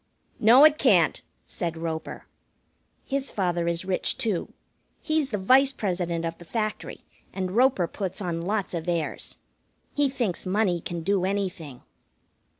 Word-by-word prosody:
"No, 245 +7 +8
it 310 0 +5
can't!" - - +4 0.2
said 170 -4 -4
Roper. 160 -1 -5 0.8
His 275 0 -2
father 175 -3 -1
is 170 +1 -1
rich, 185 -1 -1
too. 220 -9 -2 0.5
He's 310 -3 0
the 210 - -2
Vice 260 +8 +4
President 175 -7 -2
of 165 0 -3
the - - -10
Factory, 215 +3 -4 0.3
and 185 -1 -3
Roper 245 -3 +3
puts 190 +1 -5
on 175 -4 -3
lots 205 -2 -1
of 170 0 -3
airs. 170 -3 -3 0.6
He 290 -1 +2
thinks 225 -9 -2
money 185 -3 +1
can 170 0 -5
do 195 +1 +1
anything. 185 -9 -3
190 Hz, 145 wpm, -26 LUFS, 170-225 Hz, 0.8 s, No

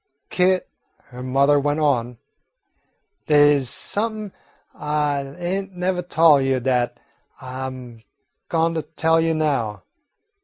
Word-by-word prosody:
"Kit," 185 0 +2 0.4
her 125 0 -9
mother 140 +3 +3
went 145 +2 0
on, 125 -5 0 1.1
"dey 145 -1 +5
's 130 -3 -4
somep'n 215 -1 -3 0.4
I 145 -2 -2
ain't 190 +2 -4
nevah 180 0 -1
tol' 165 -4 +4
you 135 -1 +1
dat 120 -1 -1 0.4
I 130 0 -6
'm 125 -3 -10 0.5
goin' 165 0 +1
to 160 - -1
tell 160 +1 +1
you 165 0 +1
now. 135 -10 -1
145 Hz, 120 wpm, -22 LUFS, 130-165 Hz, 1.1 s, dey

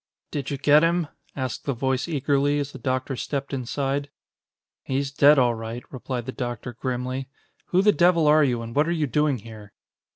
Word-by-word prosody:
"Did 140 -3 -3
you 140 - -2
get 145 +2 +5
him?" 170 -2 +1 0.3
asked 130 -3 -4
the 140 - 0
voice 130 +3 -1
eagerly, 145 -2 +1
as 145 -1 -2
the 135 - -10
doctor 130 +2 -2
stepped 140 +2 -4
inside. 135 +2 -2 0.7
"He's 135 +1 -2
dead 145 +1 +6
all 125 -2 +4
right," 115 +2 -6
replied 125 -2 -4
the 130 - -4
doctor 120 -2 -5
grimly. 130 +2 -3 0.4
"Who 185 +2 +2
the 210 - +6
devil 175 -4 +4
are 150 +1 +6
you, 120 -4 0
and 115 0 -8
what 150 +2 +3
are - - 0
you 150 - +2
doing 150 0 +1
here?" 110 -2 -12
135 Hz, 190 wpm, -24 LUFS, 125-145 Hz, 0.7 s, dead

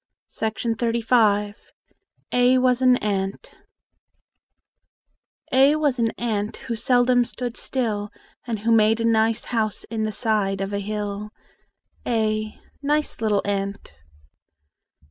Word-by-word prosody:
OLD 225 +1 -1
CAROL 225 -3 +2 0.8
A 250 +1 +4
WAS 255 0 +2
AN 255 -1 +5
ANT 195 -2 -3 2.0
A 270 +3 +5
was 290 -5 0
an 230 -1 +2
ant 215 -3 -2
Who 235 - -5
seldom 245 +2 +3
stood 240 0 -5
still, 215 -5 -2 0.4
And 225 -3 -3
who 230 +2 +1
made 220 0 +4
a 230 - 0
nice 225 0 +2
house 215 -3 -1
In 225 -1 -2
the 215 0 -1
side 210 -4 0
of 195 +1 -3
a 200 - -1
hill. 210 0 -4 0.8
a 215 -2 -1 0.2
Nice 295 -2 -1
little 210 -2 +1
ant! 200 - -3
225 Hz, 120 wpm, -23 LUFS, 210-245 Hz, 2.0 s, AN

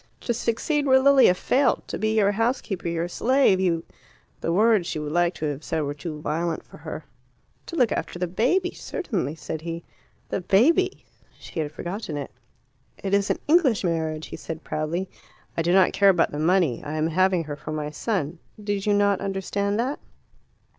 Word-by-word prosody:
"To 240 - -1
succeed 280 +6 0
where 265 0 +6
Lilia 270 -8 +6
failed! 270 +9 +2
To - - -4
be 220 0 +1
your 200 -1 +4
housekeeper, 225 -4 -1
your 170 0 -1
slave, 245 0 +3
you 170 -3 +1 0.3
" - - -34
The 165 - -1
words 210 -1 +3
she - - -3
would 150 -1 -4
like 175 +1 +2
to 155 - -4
have 145 0 -3
said 160 0 -1
were 145 -1 -2
too 150 +1 -6
violent 165 +2 -2
for - - -15
her. - - -7 0.6
"To 335 - -6
look 250 -9 +3
after - - -3
the 180 - 0
baby, 260 - +1
certainly," 190 - -3
said 160 0 -6
he. 165 0 -5 0.5
"The - - -2
baby 320 - +3 0.2
?" - - -31
She - - -7
had 150 -2 -2
forgotten 175 -1 -5
it. 140 - -5 0.7
"It 195 0 -4
is 200 0 +2
an - - +1
English 295 -10 +4
marriage," 160 -3 -2
he - - -7
said 160 -1 -7
proudly. 165 +5 -2 0.5
"I - - 0
do 170 +1 +1
not 190 0 +5
care 200 -1 +5
about 175 -3 +3
the 145 - -4
money. 165 -6 +2
I 150 - -5
am 155 0 0
having 185 +1 +2
her 150 -2 -5
for 150 +1 -8
my 150 -1 -3
son. 170 -2 -2 0.2
Did 205 -1 -2
you 205 - +4
not 200 -1 +2
understand 200 +1 -1
that?" 260 +5 -1
185 Hz, 195 wpm, -25 LUFS, 160-220 Hz, 0.7 s, where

